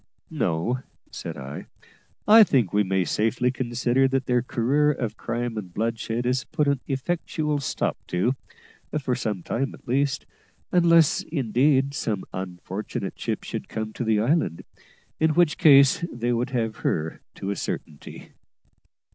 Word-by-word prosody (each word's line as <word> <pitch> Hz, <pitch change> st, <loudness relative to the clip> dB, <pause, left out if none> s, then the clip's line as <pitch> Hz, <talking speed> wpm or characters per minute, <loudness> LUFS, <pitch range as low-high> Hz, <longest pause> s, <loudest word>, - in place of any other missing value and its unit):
"No," 85 Hz, +11 st, 0 dB, 0.3 s
said -, -, -6 dB
I; 70 Hz, +3 st, -7 dB, 0.6 s
"I 220 Hz, +1 st, +9 dB
think 125 Hz, -, +2 dB
we 105 Hz, -, +4 dB
may 95 Hz, -1 st, +1 dB
safely 115 Hz, +7 st, +1 dB
consider 125 Hz, +1 st, +1 dB
that 135 Hz, 0 st, 0 dB
their 125 Hz, -1 st, +2 dB
career 130 Hz, +5 st, +1 dB
of 115 Hz, -7 st, -3 dB
crime 120 Hz, 0 st, -3 dB
and 95 Hz, -4 st, -9 dB
bloodshed 115 Hz, +3 st, -2 dB
is 125 Hz, +1 st, +1 dB
put 150 Hz, -2 st, -1 dB
an 140 Hz, -1 st, +2 dB
effectual 150 Hz, +1 st, -1 dB
stop 140 Hz, -, -2 dB
to, 95 Hz, +9 st, +1 dB, 0.7 s
for 130 Hz, -3 st, -1 dB
some 110 Hz, -7 st, -2 dB
time 135 Hz, +3 st, -2 dB
at -, -, -22 dB
least; 135 Hz, +2 st, 0 dB, 0.5 s
unless, 170 Hz, -3 st, +5 dB
indeed, 135 Hz, 0 st, +2 dB
some 105 Hz, -8 st, -2 dB
unfortunate 95 Hz, +2 st, -5 dB
ship -, -, -3 dB
should -, -, -6 dB
come 110 Hz, -1 st, -4 dB
to -, -, -3 dB
the 110 Hz, -2 st, +2 dB
island, 115 Hz, -, +1 dB, 0.6 s
in 155 Hz, -1 st, +2 dB
which 175 Hz, -3 st, +3 dB
case 140 Hz, -2 st, +6 dB
they 120 Hz, 0 st, -1 dB
would 120 Hz, +3 st, -1 dB
have 115 Hz, -4 st, -2 dB
her 80 Hz, 0 st, -2 dB
to 100 Hz, -, -4 dB
a -, -, -2 dB
certainty." 75 Hz, -6 st, -6 dB
125 Hz, 145 wpm, -25 LUFS, 110-140 Hz, 0.7 s, I